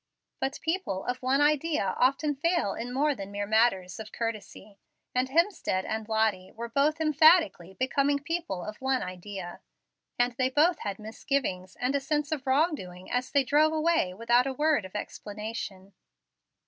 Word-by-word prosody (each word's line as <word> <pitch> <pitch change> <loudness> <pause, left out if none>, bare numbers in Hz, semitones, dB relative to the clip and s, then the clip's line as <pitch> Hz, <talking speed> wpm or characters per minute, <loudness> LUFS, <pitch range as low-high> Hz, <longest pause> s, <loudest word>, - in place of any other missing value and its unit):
But 270 +1 -2
people 325 - -2
of 250 +1 -3
one 265 +2 +2
idea 295 - +2
often 275 +4 +2
fail 330 - 0
in 240 +2 -5
more 290 +4 +2
than 200 -6 -8
mere 205 0 -3
matters 205 -4 +2
of 220 0 -8
courtesy; 215 -3 -6 0.3
and 255 +1 +1
Hemstead 325 - +1
and 220 0 -4
Lottie 215 -4 0
were 235 +1 -7
emphatically 310 - +4
becoming 275 +3 +1
people 285 - -3
of 210 +4 -7
one 265 0 +1
idea. 185 0 -7 0.6
And 245 0 +2
they 255 0 +3
both 310 +6 +3
had 200 -1 -4
misgivings 215 -4 -3
and 255 +3 0
a - - +3
sense 295 +2 -1
of 285 -3 -3
wrong 305 +6 +3
doing 180 -8 -8
as 250 +1 -1
they 280 -1 +3
drove 300 +4 +3
away 315 - +2
without 235 +4 +3
a 270 - -2
word 295 -5 +2
of 185 - -12
explanation. 210 -2 -6
255 Hz, 160 wpm, -28 LUFS, 205-295 Hz, 0.6 s, emphatically